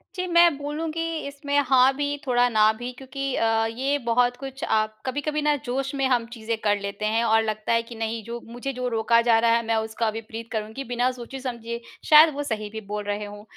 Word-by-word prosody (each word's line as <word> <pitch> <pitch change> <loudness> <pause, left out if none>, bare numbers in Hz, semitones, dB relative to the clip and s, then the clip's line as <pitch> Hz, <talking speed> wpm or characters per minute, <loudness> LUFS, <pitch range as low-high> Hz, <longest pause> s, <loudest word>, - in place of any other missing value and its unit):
जी, 365 0 -2
मैं 340 -3 +5
बोलूँगी, 310 +3 -3 0.3
इसमें 285 0 -2
हाँ 260 0 +5
भी, 290 0 -1
थोड़ा 245 -1 +3
ना 215 -1 +4
भी, 245 +1 -5
क्योंकि 270 +1 -4
अ, 225 0 +2
ये 265 +6 -1
बहुत 245 +1 +2
कुछ 270 0 -8
आप 215 0 +1
कभी-कभी 295 +3 -2
ना, 295 0 +2
जोश 265 +3 -2
में 270 -1 0
हम 240 -3 +2
चीज़ें 225 -1 -3
कर 205 -1 +2
लेते 200 +1 -4
हैं 225 +2 +1
और 225 -1 +3
लगता 215 +1 -1
है 230 0 +2
कि 230 0 -11
नहीं, 225 0 -3
जो 235 +2 -6
मुझे 245 +4 -5
जो 250 0 -3
रोका 230 0 +3
जा 225 -1 +6
रहा 230 0 +3
है, 235 - +2
मैं 225 0 +1
उसका 220 0 -1
विपरीत 225 +1 -7
करुँगी, 220 +4 -4
बिना 245 +1 0
सोचे-समझे। 240 -2 -6 0.3
शायद, 305 0 +8
वो 290 +1 -3
सही 215 -5 -3
भी 220 +1 -7
बोल 210 0 -3
रहे 205 +1 -3
हों। 205 0 -10
235 Hz, 215 wpm, -24 LUFS, 220-275 Hz, 0.3 s, शायद